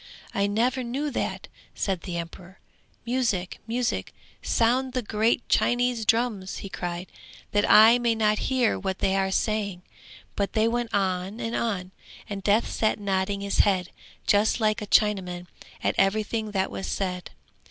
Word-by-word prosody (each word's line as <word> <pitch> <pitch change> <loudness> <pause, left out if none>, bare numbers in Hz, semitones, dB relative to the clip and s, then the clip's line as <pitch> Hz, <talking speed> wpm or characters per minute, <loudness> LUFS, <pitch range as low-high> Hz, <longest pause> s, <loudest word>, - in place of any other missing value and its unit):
'I 200 0 +1
never 245 +5 +1
knew 275 +5 -2
that,' - - -3 0.3
said 190 -4 -1
the 175 -1 -5
emperor. 175 +2 -8 0.5
'Music, 230 -7 -1
music, 240 +1 -1 0.3
sound 250 +3 +1
the 255 -1 -1
great 220 +3 +1
Chinese 245 -2 +1
drums!' 225 -5 +1
he 195 - -7
cried, 175 -1 -4 0.5
'that 205 0 +2
I 225 +3 +8
may 235 -1 +1
not 215 -1 +2
hear 255 -4 +2
what 190 -1 -3
they 190 - +1
are 195 0 +1
saying.' 200 -2 -1 0.5
But 200 -1 -1
they 220 +1 +3
went 235 0 -1
on 190 +1 -1
and 230 -1 -3
on, 190 -5 -2 0.4
and 200 -1 -5
Death 205 +4 +2
sat 220 -1 0
nodding 200 0 -1
his 200 0 -2
head, 185 -3 +3 0.3
just 210 +4 +3
like 215 0 +1
a 210 - -5
Chinaman, 185 -5 +2 0.4
at - - +2
everything 215 +2 +1
that 195 -2 -1
was 190 - -5
said. 180 -2 -3
210 Hz, 155 wpm, -26 LUFS, 190-230 Hz, 0.5 s, I